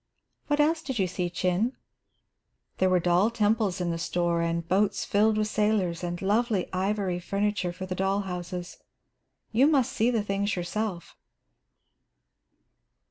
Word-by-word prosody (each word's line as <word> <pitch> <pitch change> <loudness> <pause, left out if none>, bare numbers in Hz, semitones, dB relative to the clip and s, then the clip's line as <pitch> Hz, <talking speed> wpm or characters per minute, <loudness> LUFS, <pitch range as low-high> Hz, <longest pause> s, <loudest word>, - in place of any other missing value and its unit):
"What 290 0 +1
else 315 +2 +3
did 265 -6 -4
you 195 - +2
see, 180 0 -2
Chin?" 185 +7 0 1.1
"There 185 - +3
were 185 -1 +4
doll 175 +5 +3
temples 215 -4 +1
in 175 -1 -1
the 165 - -3
store, 170 0 0
and 170 0 -1
boats 195 +3 +1
filled 215 +1 +2
with 215 0 +1
sailors, 210 -6 0
and 175 0 -3
lovely 210 -1 +1
ivory 190 -1 -1
furniture 200 0 -1
for 185 +2 -7
the 185 - -4
doll 195 +2 0
houses. 180 -1 -6 0.7
You 250 +5 +4
must 270 -4 +2
see 230 -2 +2
the 230 -4 +1
things 200 +1 -1
yourself." 180 +1 -4
195 Hz, 145 wpm, -27 LUFS, 180-215 Hz, 1.1 s, were